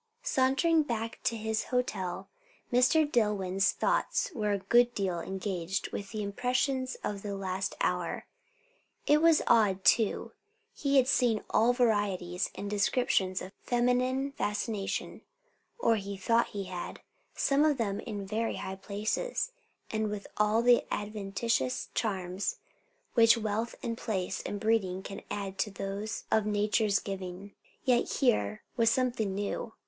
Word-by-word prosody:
Sauntering 275 +5 +3
back 230 -5 -3
to 230 - +1
his 220 0 -1
hotel, 200 -7 -2 0.5
Mr. 255 +6 +5
Dillwyn's 200 -7 +1
thoughts - - 0
were 210 -3 -1
a 200 - +2
good 240 +5 +3
deal 185 -4 -1
engaged 190 0 -3
with 200 -1 -5
the 215 -2 -4
impressions 255 +5 -1
of 200 -1 -3
the 200 -1 -4
last 195 0 -3
hour. - - -1 0.8
It 300 +1 +4
was 330 -1 +5
odd, 205 -5 +3
too; 220 -3 +3 0.4
he 280 -1 +1
had 260 -1 +5
seen 245 -5 +2
all 230 +3 +4
varieties 205 -7 +1
and 205 - -5
descriptions 200 -2 +1
of 185 - -8
feminine 250 +3 +1
fascination, 210 -4 -3 0.6
or 230 - +3
he 200 -1 -5
thought 230 +5 +2
he 200 -1 -5
had; 180 -2 -6 0.3
some 280 +1 +3
of 305 -3 +3
them 205 -4 -1
in 205 -4 -5
very 220 +3 -1
high 190 0 -5
places, 215 - -2 0.4
and 220 -1 0
with 205 -1 -5
all 210 +2 +2
the 245 0 +5
adventitious 205 - -1
charms 190 -3 -2 0.6
which 230 -1 +6
wealth 220 +1 -2
and 230 -1 -3
place 190 -3 -2
and 205 - -4
breeding 195 -4 +1
can 195 - -7
add 195 -1 -4
to 210 - +1
those 200 +2 -4
of 215 -1 +3
nature's 210 0 +2
giving. 195 0 -6 0.3
Yet 250 -2 +2
here 105 - +1
was 230 -2 +4
something 230 -5 0
new. 205 +3 -3
210 Hz, 140 wpm, -30 LUFS, 195-240 Hz, 0.8 s, which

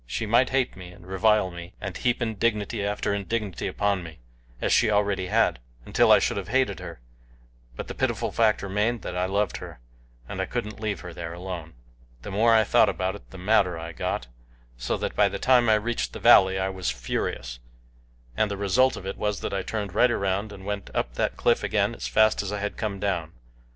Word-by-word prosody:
She 110 - -3
might 120 +4 +3
hate 135 -1 0
me, 90 -2 -10
and 90 0 -15
revile 95 +1 +2
me, 85 +1 -9
and 95 -3 -5
heap 120 0 0
indignity 110 -1 -1
after 100 0 -1
indignity 100 -1 -3
upon 100 -2 0
me, 80 -2 -10 0.4
as - - +1
she 120 - +4
already 100 -3 +1
had, 75 - +2 0.3
until - - +3
I - - +9
should - - 0
have 95 -3 -4
hated 120 -4 +1
her; 85 -4 -8 0.8
but - - -6
the - - -5
pitiful - - -1
fact 110 -3 +2
remained 105 +4 -1
that 90 - -5
I 90 +1 0
loved 100 0 0
her, - - -10 0.5
and - - -4
I - - -2
couldn't 105 +1 -4
leave 105 -4 -3
her 90 -1 -8
there 85 0 -6
alone. 85 -3 -7 0.5
The - - -6
more 110 +4 +3
I 110 -1 +6
thought 100 - +4
about 95 0 -1
it 105 - -12
the 95 - -11
madder 95 -2 +2
I 85 0 -6
got, 80 - -3 0.5
so - - -2
that - - -4
by - - +4
the - - -4
time 125 -3 +4
I 110 - +6
reached 115 +2 -2
the - - -6
valley 95 0 +6
I 95 0 0
was 95 -6 -3
furious, - - -3 0.8
and 105 - +1
the 100 - -4
result 120 +7 +2
of 95 - -9
it 95 - -4
was 105 -1 -2
that - - -3
I 100 - 0
turned 100 -1 -4
right 125 +4 +4
around 100 -1 -1
and 95 -2 -11
went 100 -1 -4
up - - -1
that - - -1
cliff 120 - +2
again 105 +1 +1
as - - -5
fast 110 0 +3
as 100 -1 -4
I 105 - -2
had 105 0 -3
come 105 -3 -3
down. 90 -5 -2
100 Hz, 215 wpm, -26 LUFS, 90-110 Hz, 0.8 s, I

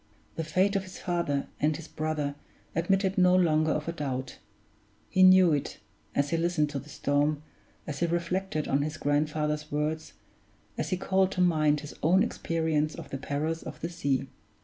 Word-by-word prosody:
The 165 - -2
fate 185 +6 +1
of 195 - +2
his 185 0 -10
father 170 -6 -1
and 150 +1 +1
his 165 -1 -10
brother 155 -2 -2 0.4
admitted 190 +3 +1
no 180 0 +5
longer 160 -3 +3
of 150 +1 -2
a - - 0
doubt; 135 -5 -4 0.7
he 185 - +2
knew 185 -2 +7
it, 145 - -2 0.4
as 140 0 +1
he 165 - +2
listened 165 -3 +1
to 140 - -3
the 150 - -13
storm, 145 +1 0 0.4
as 145 -2 -5
he 170 - +2
reflected 170 -1 -1
on 140 +1 +2
his 155 +1 -3
grandfather's 150 +1 0
words, 155 +2 -2 0.6
as - - -3
he 185 - 0
called 190 +1 +2
to 185 - 0
mind 155 -4 +3
his 150 - -8
own 180 +5 +4
experience 160 -2 -1
of - - -9
the 135 - -4
perils 150 +4 -2
of - - -8
the 165 - -2
sea. 140 -6 -1
155 Hz, 180 wpm, -28 LUFS, 150-175 Hz, 0.7 s, knew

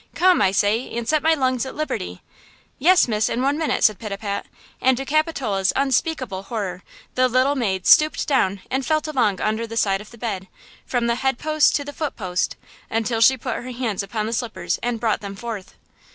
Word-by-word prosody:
Come, 365 0 +4
I 190 - +4
say, 205 +5 +1
and 235 -1 -3
set 305 +2 +2
my 320 0 +4
lungs 255 -4 0
at 265 - -6
liberty." 90 - -4 0.6
"Yes, 355 +3 +5
miss, 215 -2 +1
in 250 - -1
one 280 +2 +2
minute," 320 - 0
said 215 -3 +4
Pitapat; 200 -1 -4 0.4
and 260 -1 +3
to 270 - -4
Capitola's 270 - +1
unspeakable 265 - 0
horror 195 -4 -4 0.3
the 255 0 +3
little 255 +3 +2
maid 195 -9 -1
stooped 305 0 +5
down 200 -9 +1
and 265 +1 0
felt 310 +2 0
along 235 -10 +1
under 220 +2 -1
the 230 0 -6
side 195 -3 +2
of 210 - -12
the 235 - -14
bed, 200 -5 -4 0.4
from 245 -2 0
the 235 - +2
head 265 -2 +1
post 310 +1 +2
to 285 - -1
the 290 - -7
foot 305 -2 -3
post, 185 -3 -2 0.3
until 225 0 -1
she 265 +3 +6
put 250 -1 -3
her 250 - -7
hands 235 -6 -2
upon 210 +2 -3
the 225 - -3
slippers 235 -1 -2
and 240 -1 -2
brought 220 -2 0
them 200 -1 -6
forth! 220 -3 -7
235 Hz, 205 wpm, -22 LUFS, 210-270 Hz, 0.6 s, she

